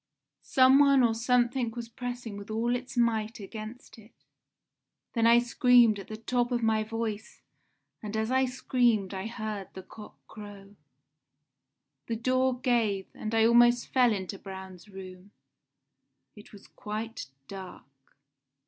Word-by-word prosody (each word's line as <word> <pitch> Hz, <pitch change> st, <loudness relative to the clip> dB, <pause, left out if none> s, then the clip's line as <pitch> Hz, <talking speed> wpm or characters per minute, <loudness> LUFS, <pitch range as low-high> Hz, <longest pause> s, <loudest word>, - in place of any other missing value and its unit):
Some 260 Hz, +1 st, +5 dB
one 275 Hz, -2 st, +5 dB
or 230 Hz, -2 st, +3 dB
something 245 Hz, +1 st, +1 dB
was 235 Hz, 0 st, -7 dB
pressing 245 Hz, -2 st, -6 dB
with 200 Hz, +1 st, -9 dB
all 230 Hz, +3 st, 0 dB
its 250 Hz, +1 st, -7 dB
might 225 Hz, -2 st, 0 dB
against 215 Hz, +4 st, -9 dB
it. 220 Hz, +1 st, -18 dB, 1.0 s
Then 230 Hz, -1 st, +2 dB
I 235 Hz, +1 st, +7 dB
screamed 240 Hz, -2 st, +4 dB
at 195 Hz, -, -10 dB
the 215 Hz, -, -7 dB
top 240 Hz, +2 st, -1 dB
of 240 Hz, -1 st, -1 dB
my 220 Hz, -1 st, +2 dB
voice, 220 Hz, 0 st, -5 dB, 0.6 s
and 215 Hz, 0 st, -5 dB
as 220 Hz, +2 st, -1 dB
I 260 Hz, 0 st, +3 dB
screamed 245 Hz, -6 st, 0 dB
I 190 Hz, +2 st, -4 dB
heard 215 Hz, -4 st, -5 dB
the 190 Hz, -, -8 dB
cock 210 Hz, +3 st, -13 dB
crow. 205 Hz, -1 st, -12 dB, 1.3 s
"The 230 Hz, -, -2 dB
door 255 Hz, +2 st, 0 dB
gave, 225 Hz, -7 st, 0 dB
and 220 Hz, +1 st, -4 dB
I 225 Hz, 0 st, +4 dB
almost 240 Hz, +1 st, +4 dB
fell 250 Hz, -3 st, +4 dB
into 195 Hz, -1 st, -4 dB
Braun's 190 Hz, 0 st, -10 dB
room. 190 Hz, 0 st, -11 dB, 1.0 s
It 210 Hz, -, -15 dB
was 205 Hz, -, -14 dB
quite 215 Hz, -7 st, -6 dB, 0.2 s
dark. 190 Hz, -2 st, -9 dB
225 Hz, 140 wpm, -28 LUFS, 210-245 Hz, 1.3 s, I